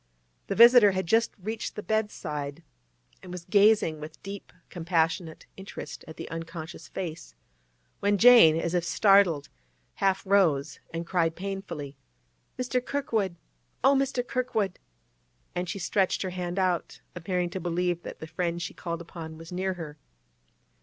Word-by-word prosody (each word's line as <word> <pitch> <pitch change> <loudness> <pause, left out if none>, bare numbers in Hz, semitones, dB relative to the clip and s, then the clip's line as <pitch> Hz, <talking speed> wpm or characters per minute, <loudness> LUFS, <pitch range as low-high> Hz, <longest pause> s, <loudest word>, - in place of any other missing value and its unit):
The 195 - -2
visitor 235 -2 +8
had 190 0 -1
just 225 +6 +2
reached 215 +3 -5
the 210 - -6
bedside, 160 -9 -3 0.6
and 180 - -10
was 180 -1 -7
gazing 200 -5 +4
with 155 +1 -9
deep, 200 0 -8 0.2
compassionate 165 -1 -1
interest 195 0 -8
at 160 - -10
the - - -6
unconscious 165 -1 -7
face, 170 -3 -6 0.6
when 205 0 +2
Jane, 230 -8 +8
as 170 +1 -2
if 175 -1 +1
startled, 180 -3 +4 0.5
half 195 0 +1
rose 160 -8 +2
and 165 +1 -4
cried 165 -2 +1
painfully, 180 -7 -6 0.6
'Mr. 250 0 -1
Kirkwood! 225 -10 -1 0.5
oh, 275 - +6
Mr. 270 -2 0
Kirkwood!' 230 -8 -1 0.7
and 180 0 -3
she 205 - -3
stretched 195 0 0
her 185 - -3
hand 180 0 -4
out, 185 -3 -1
appearing 180 0 -2
to 190 - -4
believe 175 0 -1
that - - -8
the - - -8
friend 170 +1 -2
she 175 - -5
called 170 -1 -5
upon 160 -2 -9
was 165 +1 -11
near 185 +1 -2
her. 155 -4 -8
180 Hz, 145 wpm, -27 LUFS, 165-200 Hz, 0.7 s, visitor